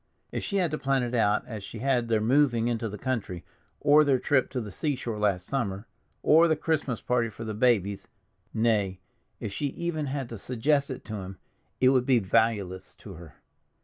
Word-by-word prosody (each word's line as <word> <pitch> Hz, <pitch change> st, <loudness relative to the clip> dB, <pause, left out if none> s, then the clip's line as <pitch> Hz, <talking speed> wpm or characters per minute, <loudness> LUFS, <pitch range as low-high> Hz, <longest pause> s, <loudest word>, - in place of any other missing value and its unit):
If -, -, -3 dB
she 200 Hz, -, -4 dB
had 175 Hz, -5 st, +1 dB
to 155 Hz, -, -2 dB
plan 135 Hz, -1 st, +1 dB
it 120 Hz, 0 st, -3 dB
out 105 Hz, -3 st, +2 dB
as 110 Hz, -5 st, -7 dB
she 115 Hz, -, -8 dB
had 125 Hz, 0 st, +1 dB
their 115 Hz, -1 st, +2 dB
moving 120 Hz, -1 st, +3 dB
into 115 Hz, -1 st, -1 dB
the 105 Hz, -, -7 dB
country, 110 Hz, -8 st, -3 dB, 0.3 s
or 150 Hz, +1 st, +6 dB
their 140 Hz, -3 st, +3 dB
trip 130 Hz, 0 st, +1 dB
to 130 Hz, -, -3 dB
the 105 Hz, -4 st, -6 dB
seashore 125 Hz, -, -3 dB
last 100 Hz, -3 st, +1 dB
summer, 100 Hz, -7 st, -2 dB, 0.4 s
or 165 Hz, +2 st, +6 dB
the 160 Hz, -, +3 dB
Christmas 150 Hz, -6 st, -1 dB
party 120 Hz, -2 st, 0 dB
for 110 Hz, +2 st, -9 dB
the 110 Hz, -1 st, -4 dB
babies—nay, 105 Hz, -1 st, -1 dB, 0.4 s
if 100 Hz, -, -5 dB
she 145 Hz, -, -1 dB
even 155 Hz, 0 st, -3 dB
had 135 Hz, -2 st, -3 dB
to 115 Hz, -, -7 dB
suggest 140 Hz, +6 st, 0 dB
it 130 Hz, -, -7 dB
to 110 Hz, -1 st, -5 dB
him, 95 Hz, -1 st, -7 dB, 0.4 s
it 130 Hz, -, +5 dB
would 130 Hz, -1 st, +2 dB
be 130 Hz, -2 st, +5 dB
valueless 100 Hz, -2 st, 0 dB
to 100 Hz, -, -11 dB
her. 80 Hz, -4 st, -12 dB
120 Hz, 195 wpm, -27 LUFS, 105-135 Hz, 0.4 s, or